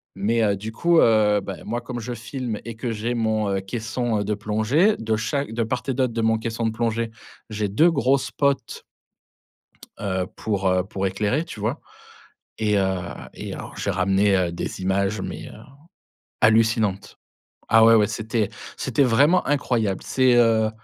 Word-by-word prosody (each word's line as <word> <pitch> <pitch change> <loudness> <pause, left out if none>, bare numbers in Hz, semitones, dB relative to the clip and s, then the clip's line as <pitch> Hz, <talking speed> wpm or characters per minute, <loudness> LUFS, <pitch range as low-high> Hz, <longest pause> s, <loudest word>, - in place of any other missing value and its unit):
Mais 110 +4 +1
heu, 100 -2 +1
du 110 +3 -7
coup, 170 +6 +3
heu, 105 -2 +4
bah 95 0 -6
moi 120 +3 -3
comme 120 0 -6
je 120 +2 -5
filme 120 -1 -5
et 115 -1 -6
que 120 +1 -3
j'ai 115 +2 -2
mon, 110 -2 0
heu, 95 -1 -1
caisson, 115 +2 -2
heu, - - -1
de 105 - 0
plongée 110 - +1
de 110 -1 -1
chaque 110 +3 -2
de 115 0 0
part 125 +3 -3
et 135 - 0
d'autre 130 -1 0
de 115 0 -2
mon 110 0 +2
caisson 115 +1 -3
de 115 - +1
plongée, 115 0 -1 0.4
j'ai 105 -1 -2
2 155 - +4
gros 140 -4 +2
spots. 135 0 -2 1.2
Heu, 95 -3 -2
pour, 100 -3 -2
heu, 90 0 +2
pour 95 0 -4
éclairer, 105 - -1
tu 160 - -9
vois? 110 +9 -2 0.8
Et 105 -2 +1
heu, 95 -2 0 0.3
et - - -7
alors - - -9
j'ai - - -2
ramené, 95 +1 +2
heu, 90 -2 +1
des 85 - -5
images 95 +2 0
mais - - -6
heu, - - -12 0.9
hallucinantes 110 -3 +2 0.5
ah 115 0 +6
ouais, 115 0 +7
ouais, 105 -2 +4
c'était 110 -1 -2 0.3
c'était 140 - +1
vraiment 140 +9 +3
incroyable, 120 -8 0
c'est, 130 -2 +3
heu, 115 -2 +4
110 Hz, 180 wpm, -23 LUFS, 105-120 Hz, 1.2 s, ouais